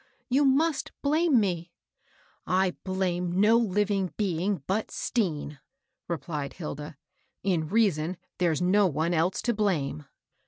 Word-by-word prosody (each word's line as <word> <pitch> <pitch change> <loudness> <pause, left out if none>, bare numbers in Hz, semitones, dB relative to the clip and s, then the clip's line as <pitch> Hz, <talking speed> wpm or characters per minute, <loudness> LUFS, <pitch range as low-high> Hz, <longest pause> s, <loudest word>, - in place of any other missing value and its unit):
You 275 +3 +3
must 290 +3 +2
blame 305 -1 +3
me! 175 -4 -2 0.4
*' - - -34 0.2
"I 185 -2 -1
blame 180 -1 -1
no 215 +3 +5
living 205 -3 0
being 190 -3 -1
but 210 +3 -1
Stean," 155 - -2 0.5
replied 150 -4 -4
Hilda. 150 -2 -7 0.3
" - - -45
In 175 -5 +1
reason, 185 -6 +1 0.2
there's 175 -1 +1
no 195 +2 +4
one 160 +2 0
else 170 +3 +1
to 240 - +1
blame." 155 -9 -1
185 Hz, 130 wpm, -27 LUFS, 165-210 Hz, 0.5 s, no